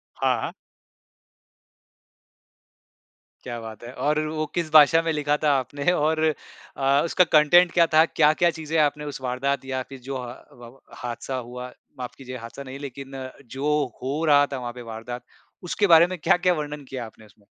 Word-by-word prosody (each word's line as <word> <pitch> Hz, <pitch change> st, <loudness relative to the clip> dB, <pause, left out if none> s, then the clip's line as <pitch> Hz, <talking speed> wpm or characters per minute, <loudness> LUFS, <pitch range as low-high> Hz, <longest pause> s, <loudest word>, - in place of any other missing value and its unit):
हाँ, -, -, +1 dB
हाँ। -, -, -4 dB, 2.9 s
क्या 120 Hz, -1 st, -5 dB
बात 110 Hz, -1 st, -9 dB
है। 120 Hz, -, -8 dB
और 150 Hz, +2 st, 0 dB
वो 155 Hz, 0 st, -2 dB
किस 170 Hz, -3 st, -2 dB
भाषा 155 Hz, +1 st, +7 dB
में 165 Hz, 0 st, 0 dB
लिखा 150 Hz, -1 st, 0 dB
था 150 Hz, -, +4 dB
आपने 140 Hz, +5 st, -1 dB
और 155 Hz, -1 st, +1 dB, 0.5 s
अ, 140 Hz, +1 st, +3 dB
उसका 175 Hz, +2 st, +3 dB
अ, -, -, -16 dB
कंटेंट 165 Hz, +3 st, +6 dB
क्या 170 Hz, -1 st, +4 dB
था? 160 Hz, -, +7 dB
क्या-क्या 155 Hz, +3 st, +3 dB
चीज़ें 160 Hz, -1 st, -3 dB
आपने 150 Hz, 0 st, +1 dB
उस 145 Hz, -2 st, -6 dB
वारदात 130 Hz, +2 st, -2 dB
या 130 Hz, -1 st, -3 dB
फिर 135 Hz, -, -10 dB
जो 135 Hz, -, -3 dB
हा 120 Hz, -1 st, -7 dB, 0.2 s
व 120 Hz, +2 st, -14 dB, 0.2 s
हादसा 125 Hz, +2 st, -4 dB
हुआ, 125 Hz, 0 st, -7 dB, 0.3 s
माफ़ 125 Hz, -1 st, -6 dB
कीजिए 130 Hz, -1 st, -8 dB
हादसा 115 Hz, +4 st, -9 dB
नहीं 135 Hz, 0 st, -8 dB
लेकिन 135 Hz, -1 st, -7 dB, 0.3 s
जो 150 Hz, +2 st, +1 dB, 0.3 s
हो 140 Hz, +5 st, -2 dB
रहा 145 Hz, -2 st, +5 dB
था 135 Hz, -, -2 dB
वहाँ 120 Hz, -1 st, -5 dB
पे 125 Hz, 0 st, -10 dB
वारदात, 120 Hz, +2 st, -7 dB, 0.4 s
उसके 185 Hz, +3 st, 0 dB
बारे 165 Hz, +1 st, +7 dB
में 185 Hz, 0 st, -6 dB
क्या-क्या 180 Hz, +3 st, +3 dB
वर्णन 150 Hz, -2 st, -5 dB
किया 125 Hz, -3 st, -5 dB
आपने 110 Hz, 0 st, -16 dB
उसमें? 105 Hz, 0 st, -25 dB
140 Hz, 175 wpm, -24 LUFS, 125-155 Hz, 2.9 s, भाषा